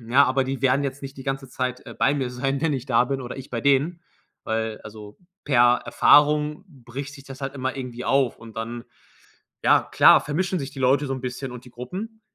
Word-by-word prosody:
Ja, 125 +5 +4
aber 130 +1 +1
die 135 0 -4
werden 135 +1 +3
jetzt 140 0 -4
nicht 135 0 -7
die - - -7
ganze 135 0 -3
Zeit, 125 0 -3
äh, - - -9
bei 145 - +3
mir 130 -3 -2
sein, 135 +3 -2
wenn 160 - +2
ich 130 -2 -3
da 120 -2 +3
bin 135 +1 -3
oder 125 -1 -7
ich 135 -1 -9
bei 115 - -3
denen, 140 +6 +2 0.4
weil 110 -1 -2
also, 105 -1 -11 0.3
per 120 -3 +4
Erfahrung 150 +3 +4
bricht 135 -2 -8
sich 140 -2 -13
das 135 0 -10
halt 135 - -3
immer 130 0 -3
irgendwie 125 -2 -6
auf 135 -3 +2
und 115 -1 -13
dann, 115 +1 -5 0.8
ja, - - +5
klar, - - +6
vermischen 180 +5 -1
sich 140 -4 -5
die 135 - -9
Leute 135 +3 +3
so 135 - -2
'n 130 - -5
bisschen 125 +1 -5
und 125 0 -10
die - - -12
Gruppen. 195 - -7
135 Hz, 225 wpm, -24 LUFS, 125-140 Hz, 0.8 s, klar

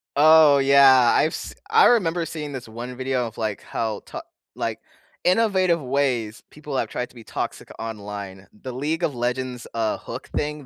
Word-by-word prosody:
Oh, 155 -1 +7
yeah, 135 -3 +6
I've 155 - +2
s - - -6 0.2
I 445 0 +6
remember 175 -8 +3
seeing 150 -2 -6
this 130 -4 -7
one 120 +3 -7
video 130 -2 -1
of, 110 - -12
like, 110 -3 -3
how 110 -3 -3
ta - - -7 0.3
like, - - -3 0.4
innovative 185 -4 +2
ways 125 -5 -1
people 150 -2 -6
have - - -1
tried 125 - -4
to - - -23
be 115 - -12
toxic - - -5
online. 100 -3 -7
The 130 +4 -9
League 155 +6 -2
of 145 - 0
Legends, 125 0 -3
uh, 110 -2 -1
hook - - -8
thing, 150 -1 -3
130 Hz, 175 wpm, -23 LUFS, 115-150 Hz, 0.4 s, Oh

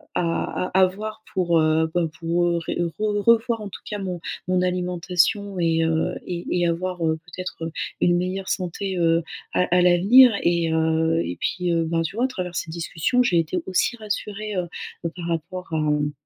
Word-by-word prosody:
à 170 +1 -1
à 190 0 +6
voir 215 +4 -5
pour, 170 -3 +2
heu, 160 +1 +2
ben 175 -2 +1
pour 170 0 +1
ré - - -3
re 205 +5 -1
revoir 230 0 +4
en 210 - -5
tout - - -10
cas 210 - -4
mon 185 -3 -4 0.3
mon 185 0 +2
alimentation 180 +2 0
et 165 -1 +2
heu, 160 0 0
et 175 -1 -5
et 175 -1 +1
avoir, 175 0 -2
heu, 160 0 +1
peut-être, 180 +1 -7
heu, 165 - -4 0.3
une 175 - +3
meilleure 185 +2 -2
santé, 190 +1 -2
heu, 165 -1 +3 0.3
à - - +3
à 180 - +5
l'avenir 195 +9 +7
et 170 -1 +2
heu, 160 0 +2
et 90 - -4
puis, 180 -1 -1
heu, 165 -1 +2
ben 165 0 0
tu 165 - -5
vois 240 +3 +2
à - - +2
travers 180 -7 -5
cette 170 - -3
discussion, 170 +8 0
j'ai 180 -8 +3
été 165 +2 -1
aussi 190 +6 0
rassurée, 210 -1 -4
heu 180 -1 -1 0.4
heu, - - +1
par 175 -2 -6
rapport 170 +2 -4
à, - - +1
mmh, 150 -1 +1
180 Hz, 195 wpm, -23 LUFS, 165-190 Hz, 0.4 s, l'avenir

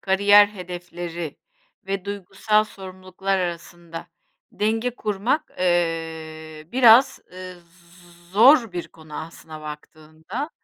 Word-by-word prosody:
kariyer 200 +1 +6
hedefleri 175 -4 -7 0.5
ve 195 -1 -3
duygusal 205 +2 0
sorumluluklar 190 0 -4
arasında 170 -1 -6 0.5
denge 225 +4 0
kurmak, 220 +10 -1
eee, 160 -3 -2
biraz, 255 +2 +6
eee, 185 0 -8
z 175 0 -21
zor 230 0 +6
bir 175 -1 -5
konu, 160 -2 -14
aslına 160 -1 -10
baktığında. 155 - -8
180 Hz, 95 wpm, -23 LUFS, 165-205 Hz, 0.5 s, kariyer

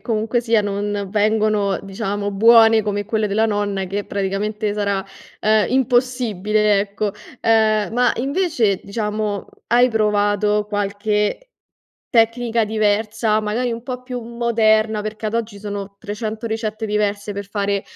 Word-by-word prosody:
comunque 225 +1 -1
sia 230 -3 +2
non 205 0 -2
vengono, 215 -1 +1
diciamo, 200 +1 -3
buone 225 +2 +6
come 205 -1 -2
quelle 220 0 0
della 215 +3 +2
nonna, 205 -2 -1
che 200 +2 -3
praticamente 205 +2 -2
sarà, 200 -2 -1 0.4
uhm, 215 0 +4
impossibile, 230 -5 +1
ecco. 205 0 -2 0.3
Uhm, 220 -1 +3
ma 245 +1 +3
invece, 265 - 0
diciamo, 210 -1 -3 0.2
hai 245 +2 +5
provato 210 -1 +1
qualche 210 - -1 0.6
tecnica 230 -1 +2
diversa, 215 +1 +1
magari, 230 +3 -1
un 230 0 -6
po' 250 0 -6
più 250 -1 -5
moderna, 225 -2 +1
perché 215 +1 -5
ad 215 - -3
oggi 225 -3 -3
sono 200 -1 -6
300 215 +2 -5
ricette 220 0 -3
diverse 205 0 -1
per 200 0 -6
fare 200 -1 -1
215 Hz, 130 wpm, -20 LUFS, 205-225 Hz, 0.6 s, buone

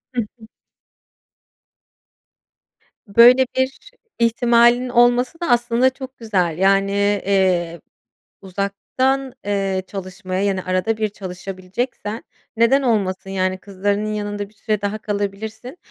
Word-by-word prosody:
Hı 240 - +2
hı. 220 +1 -12 2.6
Böyle 240 +5 +7
bir 260 0 +2 0.5
ihtimalin 235 +1 +3
olması 245 +5 +3
da, 340 -5 -3
aslında 240 +1 +3
çok 260 0 -10
güzel, 185 -8 -1
yani, 195 +1 +3 0.3
eee, 180 -4 +1 0.6
uzaktan, 205 +8 -2
eee, 195 -2 -1
çalışmaya, 185 -1 -5
yani, 195 -2 0
arada 185 +4 0
bir 215 -1 0
çalışabileceksen, 195 +4 -5 0.3
neden 235 +5 +4
olmasın, 195 -6 -1
yani, 185 -1 -1
kızlarının 205 +2 -2
yanında 205 -1 -4
bir - - -26
süre 215 0 -2
daha 205 +1 -2
kalabilirsin. 215 - -5
205 Hz, 105 wpm, -20 LUFS, 195-240 Hz, 2.6 s, Böyle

